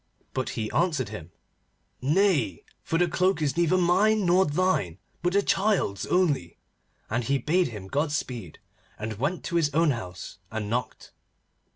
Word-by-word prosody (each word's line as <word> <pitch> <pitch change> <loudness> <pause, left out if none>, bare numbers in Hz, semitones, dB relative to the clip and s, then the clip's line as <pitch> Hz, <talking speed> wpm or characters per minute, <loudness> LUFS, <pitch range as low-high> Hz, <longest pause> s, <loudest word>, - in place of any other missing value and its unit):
But 130 - -2
he 110 -1 -2
answered 155 - +1
him: 85 -7 -8 0.7
'Nay, 145 - +2 0.2
for 165 - -1
the 175 +1 +3
cloak 185 +1 +1
is 145 -4 0
neither 170 +1 +3
mine 195 +4 +3
nor 180 +2 +4
thine, 150 - 0 0.2
but 175 +1 0
the 200 0 +3
child's 195 - +1
only,' 145 - +1 0.5
and 115 +2 -1
he 140 +3 +2
bade 170 +7 +1
him 105 -5 -8
Godspeed, 130 - -2 0.4
and 110 -1 -5
went 170 +8 -1
to 170 - -1
his 150 -3 +2
own 165 -1 +4
house 95 -5 -7
and 110 -1 -4
knocked. 120 -1 -3
150 Hz, 155 wpm, -26 LUFS, 110-180 Hz, 0.7 s, nor